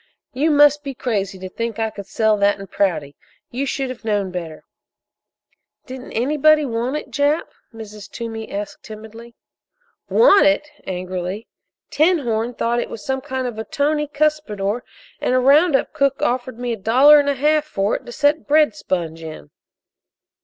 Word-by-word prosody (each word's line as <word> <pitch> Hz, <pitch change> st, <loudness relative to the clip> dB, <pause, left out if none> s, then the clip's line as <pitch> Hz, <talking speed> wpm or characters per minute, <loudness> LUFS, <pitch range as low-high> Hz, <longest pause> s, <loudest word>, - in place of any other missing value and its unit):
"You 285 Hz, +5 st, +1 dB
must 295 Hz, -1 st, +5 dB
be 275 Hz, -2 st, -6 dB
crazy 200 Hz, -6 st, -2 dB
to 185 Hz, 0 st, -7 dB
think 230 Hz, +3 st, -4 dB
I 220 Hz, -1 st, -1 dB
could 200 Hz, -2 st, -9 dB
sell 220 Hz, +2 st, +2 dB
that 200 Hz, 0 st, +2 dB
in 195 Hz, -, -7 dB
Prouty! 170 Hz, -8 st, -1 dB, 0.4 s
You 270 Hz, +3 st, -2 dB
should 270 Hz, -1 st, -2 dB
have 250 Hz, -, -10 dB
known 205 Hz, -4 st, -1 dB
better!" 165 Hz, -4 st, -7 dB, 1.2 s
"Didn't 260 Hz, 0 st, -9 dB
anybody 300 Hz, +5 st, +3 dB
want 240 Hz, +2 st, -2 dB
it, 275 Hz, -, -8 dB
Jap?" 285 Hz, +5 st, +1 dB, 0.2 s
Mrs. 215 Hz, -3 st, -10 dB
Toomey 225 Hz, -2 st, -6 dB
asked 205 Hz, +1 st, -5 dB
timidly. 225 Hz, +2 st, -11 dB, 0.7 s
"Want 405 Hz, -10 st, +6 dB
it?" 295 Hz, 0 st, +1 dB, 0.2 s
angrily. 185 Hz, +2 st, -4 dB, 0.5 s
"'Tinhorn' 245 Hz, -8 st, +1 dB
thought 235 Hz, +1 st, 0 dB
it -, -, -3 dB
was 215 Hz, -, -9 dB
some 265 Hz, 0 st, -2 dB
kind 260 Hz, -2 st, -4 dB
of 235 Hz, -3 st, -5 dB
a -, -, -2 dB
tony 295 Hz, +5 st, -1 dB
cuspidor, 280 Hz, -8 st, -1 dB, 0.4 s
and 250 Hz, -, 0 dB
a -, -, +4 dB
round 285 Hz, +5 st, +5 dB
up -, -, 0 dB
cook 275 Hz, -3 st, +1 dB
offered 250 Hz, 0 st, -1 dB
me 245 Hz, -1 st, -2 dB
a -, -, -5 dB
dollar 260 Hz, +9 st, +6 dB
and 285 Hz, 0 st, +1 dB
a 285 Hz, -, +1 dB
half 300 Hz, +3 st, +2 dB
for 200 Hz, -8 st, -1 dB
it -, -, -6 dB
to -, -, -7 dB
set 290 Hz, +4 st, +1 dB
bread 300 Hz, +1 st, +4 dB
sponge 165 Hz, -, -3 dB
in." 155 Hz, -, -9 dB
240 Hz, 170 wpm, -20 LUFS, 210-290 Hz, 1.2 s, Want